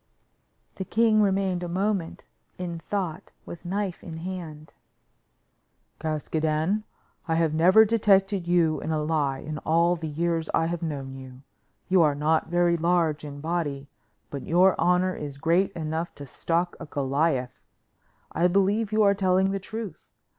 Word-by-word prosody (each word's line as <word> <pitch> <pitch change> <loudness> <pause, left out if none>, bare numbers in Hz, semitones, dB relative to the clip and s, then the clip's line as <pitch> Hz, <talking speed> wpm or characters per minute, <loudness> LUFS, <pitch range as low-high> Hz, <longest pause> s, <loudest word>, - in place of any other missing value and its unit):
The 190 - -3
king 220 +2 +3
remained 195 -3 +1
a 175 - -3
moment 190 -1 -2 0.3
in 175 -2 -5
thought 175 -1 -4
with 170 - -9
knife 195 0 -3
in 160 -2 -7
hand. 165 -3 -7 1.3
"Caskoden, 155 +5 -1 0.4
I 165 - +1
have 165 -2 +1
never 185 +7 +6
detected 200 -4 +2
you 170 -3 +2
in - - -4
a 155 -1 0
lie 150 -4 0
in 150 +2 -6
all 170 +2 +2
the 160 -2 -5
years 165 +1 -1
I 165 - +2
have 170 +1 -3
known 140 -5 -4
you; 130 0 -11 0.4
you 185 -2 +4
are 150 -3 +3
not 155 +2 +1
very 175 0 +2
large 165 -2 +1
in 145 -1 -8
body, 145 -4 -3 0.4
but 140 - -5
your 180 +5 +4
honor 180 +2 +2
is 145 -2 -7
great 170 +7 +2
enough 160 +1 -4
to 145 - -9
stock 170 +6 -1
a - - -8
Goliath. 135 -2 -1 0.7
I 175 - +2
believe 200 +4 +1
you 215 0 +3
are 200 -1 +5
telling 190 -1 +2
the 195 - -2
truth. 220 +1 -7
170 Hz, 155 wpm, -26 LUFS, 155-190 Hz, 1.3 s, never